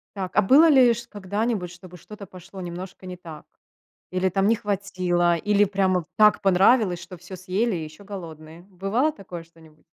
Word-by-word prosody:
Так, 190 -2 -5
а 210 - +5
было 290 +11 +6
ли 255 -5 +6
ш 235 +1 -8
когда-нибудь, 205 -1 -3
чтобы 180 0 -13
что-то 205 +3 -12
пошло 185 +2 -12
немножко 185 +2 -8
не 180 0 -7
так, 160 -4 -11 0.7
или 185 +1 0
там 195 +2 +1
не 225 - +4
хватило, 185 -5 0
или 205 +3 +2
прямо 190 -3 0
так 215 -1 +5
понравилось, 195 -1 +3
что 180 +1 -11
всё 180 +2 -10
съели 190 +4 -1
и 165 - -4
еще 155 +5 -11
голодные? 165 -5 -10
Бывало 195 - -1
такое 180 - -10
что-нибудь? 160 -2 -21
185 Hz, 175 wpm, -24 LUFS, 175-205 Hz, 0.7 s, было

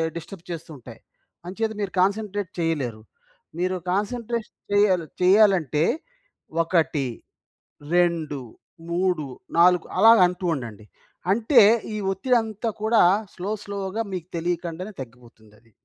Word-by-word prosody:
Disturb 170 +1 -9
చేస్తూ 165 -1 -7
ఉంటాయి. 120 -2 -13 0.5
అంచేత 220 +4 -2
మీరు 195 - -2
కాన్సంట్రేట్ 200 -1 0
చేయలేరు. 135 -10 -2 0.6
మీరు 185 +1 0 0.2
కాన్సంట్రేషన్ 230 +3 -3 0.2
చేయాలి 190 -5 +3 0.2
చేయాలంటే 180 -6 +4 0.8
1, 160 -5 +1 0.9
2, 165 -5 +1 0.5
3, 175 -3 0 0.3
4 180 0 +5
అలాగంటూ 190 -4 +5
ఉండండి. 110 -5 -8 0.5
అంటే 235 +2 +5 0.3
ఈ - - -2
ఒత్తిడి 245 +6 +2
అంతా 220 +1 -4
కూడా 220 +1 +4 0.3
స్లో 190 +4 -4
స్లోగా 200 +2 -3
మీకు 180 -1 -5
తెలియకుండానే 175 +3 -3
తగ్గిపోతుంది 115 -3 -14
అది. 115 -1 -28
180 Hz, 105 wpm, -24 LUFS, 160-205 Hz, 0.9 s, 4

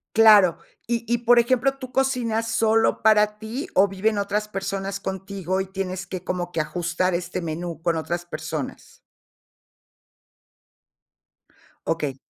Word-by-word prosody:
Claro. 210 -6 +7 0.3
Y 235 -1 -1
y, 240 - +2
por 240 0 +4
ejemplo, 255 +3 +3
¿tú 255 -2 -8
cocinas 235 -4 0
solo 225 0 +2
para 210 -1 +4
ti, 235 - -5
o 195 +2 +6
viven 205 +3 0
otras 205 +1 -1
personas 195 0 -4
contigo 190 -1 -3
y 190 - -1
tienes 185 -1 -4
que, 185 -1 -6
como 175 -1 -3
que, 165 - 0
ajustar 175 +3 -1
este 175 +1 -3
menú 165 0 -5
con 170 -1 +1
otras 170 +3 -3
personas? 155 -3 -6 2.8
Okey. 150 -5 -2
195 Hz, 130 wpm, -24 LUFS, 175-225 Hz, 2.8 s, Claro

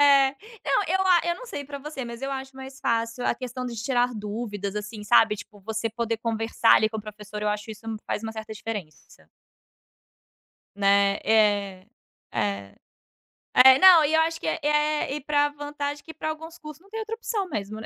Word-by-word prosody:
É. 280 -2 +6 0.3
Não, - - +2
eu 380 - +2
a 360 -2 +6
eu 345 0 0
não - - -10
sei 285 -11 -6
pra 280 +1 -7
você, 280 -2 -6
mas 235 0 -8
eu 270 0 -3
acho 265 0 -5
mais 265 0 -10
fácil 230 +1 -1
a - - +2
questão 255 0 -6
de 245 - -5
tirar 245 +1 0
dúvidas, 205 -1 -4
assim, 210 +1 -6
sabe, 210 +1 +4
tipo, 205 0 -12
você 220 +3 -3
poder 230 0 -2
conversar, 225 0 +2
ali, 215 - +4
com 220 - -4
o - - -3
professor, 210 0 -8
eu 210 - 0
acho 210 +1 -3
isso 220 +1 -9
hum, 220 - -3
faz - - -2
uma 220 - -4
certa 220 0 -7
diferença. 210 -7 -8 1.5
Né, 200 0 +3
é. 205 -3 +2 0.5
É. 100 -1 -2 0.8
É. 260 +1 +8
Não, 365 -4 +9
e 300 +1 +1
eu 320 - +5
acho 325 0 0
que - - -5
é. 320 - -1
Eh, 300 -1 +1
e 300 - -5
pra 290 0 +2
vantagem 290 0 -5
que, 320 - -10
pra 315 0 -4
alguns 320 +2 -7
cursos, 305 +1 -11
não 395 - -22
tem 445 +2 -5
outra 445 +1 -4
opção, 440 -4 -3
mesmo, 215 - -5
né? 220 - -8
240 Hz, 205 wpm, -25 LUFS, 210-295 Hz, 1.5 s, Não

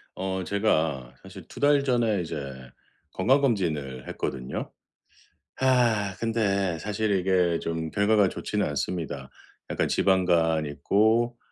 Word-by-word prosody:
어 95 0 -3
제가 80 - 0
사실 95 -1 -11
2 - - -11
달 145 -1 +4
전에 120 -7 +1
이제 80 - -5 0.8
건강검진을 95 - 0
했거든요. 65 -1 -4 0.9
아 120 -7 +2
근데 100 -6 0
사실 105 +3 -2
이게 90 -2 +2
좀 80 -1 -3
결과가 100 -1 +3
좋지는 105 +2 -2
않습니다. 75 -2 -4 0.4
약간 - - 0
지방간 85 -4 +2
있고 110 +10 +1
95 Hz, 230 characters per minute, -26 LUFS, 80-110 Hz, 0.9 s, 달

